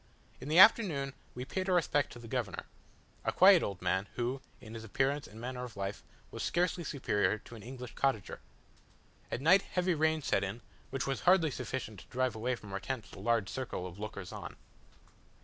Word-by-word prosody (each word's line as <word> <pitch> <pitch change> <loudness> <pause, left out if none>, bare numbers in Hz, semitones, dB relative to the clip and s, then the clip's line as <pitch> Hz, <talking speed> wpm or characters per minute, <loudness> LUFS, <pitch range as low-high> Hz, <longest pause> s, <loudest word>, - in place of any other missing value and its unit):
In - - -8
the 155 - +2
afternoon 175 - +6 0.2
we 125 +1 -5
paid 185 +7 -2
our 185 - +4
respects 145 -4 +1
to - - -10
the 120 -1 -10
governor - - -3 0.6
a - - +1
quiet 190 -2 +7
old 95 -3 -4
man, 95 +3 +1
who, 125 +2 -2 0.2
in 110 -4 -11
his 115 -1 -7
appearance 135 +6 0
and 110 - -12
manner 125 +1 -4
of 120 -5 -8
life, 100 +1 -3 0.3
was - - -6
scarcely 175 0 0
superior 115 -9 0
to 115 - -14
an 115 - -9
English 125 +1 -8
cottager. 130 -8 -1 0.9
At - - -3
night 180 +7 +6
heavy 180 -1 0
rain 160 -1 +1
set 100 - +1
in, 100 +5 -4 0.3
which 135 - -2
was 135 0 -1
hardly 175 -4 +5
sufficient 115 -7 -4
to - - -14
drive 130 -2 0
away 125 +3 -1
from 105 -4 -11
our 100 - -1
tents 115 -2 -5
the - - -11
large 115 -4 +1
circle 125 -6 -4
of 90 +1 -8
lookers 100 -3 -6
on. - - -7
125 Hz, 200 wpm, -32 LUFS, 110-150 Hz, 0.9 s, quiet